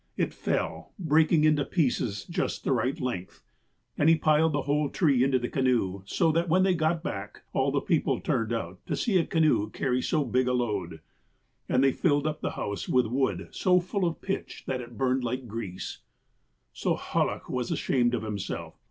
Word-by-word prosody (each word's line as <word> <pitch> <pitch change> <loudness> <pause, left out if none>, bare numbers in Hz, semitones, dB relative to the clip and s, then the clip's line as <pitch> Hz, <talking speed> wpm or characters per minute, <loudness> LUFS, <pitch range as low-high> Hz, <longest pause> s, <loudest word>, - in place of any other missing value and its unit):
It - - 0
fell, 80 - -3
breaking 160 -2 +3
into 155 -2 +4
pieces 125 - 0
just 170 - -2
the - - 0
right 130 +1 0
length, 95 -8 -4 0.6
and 150 - +5
he 165 - +7
piled 155 +1 +3
the 145 -2 -1
whole 145 0 +1
tree 140 -8 +3
into 135 -1 +3
the 120 -1 -2
canoe, 120 -9 0
so 165 +8 +2
that, 165 +2 0
when 185 +3 +4
they 190 -1 +3
got 160 0 0
back, 100 - -6
all - - +2
the - - +1
people - - +1
turned 115 0 -1
out 95 -6 -4
to - - -1
see 205 -6 +2
a 165 - +1
canoe 155 -10 +2
carry 125 +2 -1
so 150 0 0
big 125 +1 +1
a 125 - +2
load. 100 -10 -2 0.7
And 130 - +3
they 135 - +5
filled 145 0 +1
up 155 0 -2
the - - -1
house 100 0 -4
with 125 -1 +3
wood 110 -6 -1
so 180 -1 +3
full 185 +2 -1
of 170 -1 -2
pitch 195 - -4
that 130 -1 -2
it 120 -1 -11
burned 130 -1 +1
like 125 +2 -2
grease. 100 -4 -6 0.3
' - - -45
' - - -47
So - - 0
Hallach - - -1
was 125 -2 -2
ashamed 120 -2 +1
of 115 - -3
himself. 105 -3 -4
130 Hz, 200 wpm, -28 LUFS, 115-155 Hz, 0.7 s, he